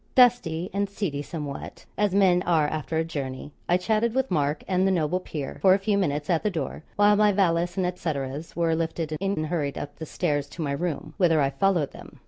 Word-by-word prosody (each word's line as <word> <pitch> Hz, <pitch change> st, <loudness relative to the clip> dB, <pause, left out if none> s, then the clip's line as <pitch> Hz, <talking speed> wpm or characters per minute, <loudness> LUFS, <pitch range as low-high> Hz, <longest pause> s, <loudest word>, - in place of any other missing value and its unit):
Dusty 225 Hz, -9 st, +4 dB
and 200 Hz, 0 st, 0 dB
seedy 185 Hz, -8 st, -3 dB
somewhat, 145 Hz, -2 st, -7 dB
as 205 Hz, -2 st, +1 dB
men 185 Hz, -3 st, +4 dB
are 165 Hz, -4 st, +2 dB
after 155 Hz, +1 st, -3 dB
a 160 Hz, -, +2 dB
journey, 140 Hz, -3 st, -5 dB, 0.2 s
I 175 Hz, -, +5 dB
chatted 220 Hz, +5 st, 0 dB
with 265 Hz, 0 st, 0 dB
Mark 145 Hz, 0 st, 0 dB
and 185 Hz, 0 st, +2 dB
the -, -, +3 dB
noble 175 Hz, 0 st, +1 dB
peer 150 Hz, -6 st, -6 dB
for 190 Hz, -1 st, +6 dB
a -, -, +2 dB
few 200 Hz, +1 st, 0 dB
minutes 150 Hz, -6 st, 0 dB
at 170 Hz, -3 st, +2 dB
the 210 Hz, -, +1 dB
door, 155 Hz, -6 st, -4 dB
while 205 Hz, 0 st, +5 dB
my 210 Hz, 0 st, +4 dB
valise 175 Hz, -2 st, +1 dB
and 185 Hz, -, +1 dB
et 180 Hz, 0 st, -3 dB
ceteras 145 Hz, -1 st, -4 dB
were 170 Hz, -1 st, +1 dB
lifted 160 Hz, -1 st, -2 dB
in 195 Hz, +6 st, -1 dB
and 155 Hz, -4 st, -1 dB
hurried 150 Hz, -4 st, -2 dB
up 145 Hz, -, -6 dB
the 160 Hz, -, -7 dB
stairs 145 Hz, -5 st, -1 dB
to 170 Hz, -, -5 dB
my 140 Hz, -, -1 dB
room, 155 Hz, 0 st, -3 dB
whither 170 Hz, -5 st, +4 dB
I 135 Hz, -1 st, +2 dB
followed 180 Hz, -4 st, +1 dB
them. -, -, -13 dB
170 Hz, 225 wpm, -26 LUFS, 150-195 Hz, 0.2 s, for